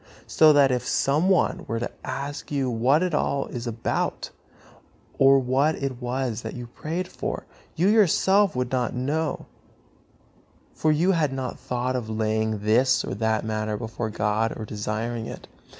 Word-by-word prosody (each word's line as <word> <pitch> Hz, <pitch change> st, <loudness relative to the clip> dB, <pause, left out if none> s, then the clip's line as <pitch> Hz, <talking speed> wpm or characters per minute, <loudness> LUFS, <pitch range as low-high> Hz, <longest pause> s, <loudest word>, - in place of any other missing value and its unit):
So 155 Hz, -1 st, +5 dB
that 140 Hz, -2 st, +5 dB
if 125 Hz, -1 st, -1 dB
some 150 Hz, +7 st, +2 dB
one 190 Hz, -, +2 dB
were 115 Hz, -, -2 dB
to 120 Hz, -, -3 dB
ask 140 Hz, +3 st, -5 dB
you 135 Hz, -3 st, 0 dB
what 130 Hz, +8 st, +3 dB
it 180 Hz, -2 st, -1 dB
all 140 Hz, -2 st, 0 dB
was 120 Hz, -1 st, -4 dB
about, 115 Hz, -1 st, -2 dB, 0.9 s
or 135 Hz, 0 st, +7 dB
what 135 Hz, +4 st, +2 dB
it 135 Hz, -2 st, -4 dB
was 125 Hz, -2 st, -2 dB
that -, -, -6 dB
you 120 Hz, -1 st, -6 dB
prayed 165 Hz, +9 st, -4 dB
for, -, -, -5 dB, 0.3 s
you 175 Hz, +4 st, +2 dB
yourself 200 Hz, -3 st, +4 dB
would 125 Hz, -1 st, -2 dB
not 125 Hz, -3 st, -1 dB
know; 145 Hz, +5 st, -2 dB, 1.3 s
for 155 Hz, -, +1 dB
you 165 Hz, +5 st, +3 dB
had 160 Hz, -6 st, +1 dB
not 130 Hz, -1 st, -4 dB
thought 125 Hz, +1 st, -2 dB
of 120 Hz, -3 st, -3 dB
laying 110 Hz, -1 st, -1 dB
this 130 Hz, +5 st, +3 dB
or -, -, -4 dB
that 110 Hz, +1 st, 0 dB
matter 110 Hz, -1 st, -2 dB
before 110 Hz, 0 st, -4 dB
God 110 Hz, +1 st, -1 dB
or 110 Hz, -, -5 dB
desiring 110 Hz, +2 st, -3 dB
it. -, -, -9 dB
125 Hz, 165 wpm, -25 LUFS, 110-145 Hz, 1.3 s, or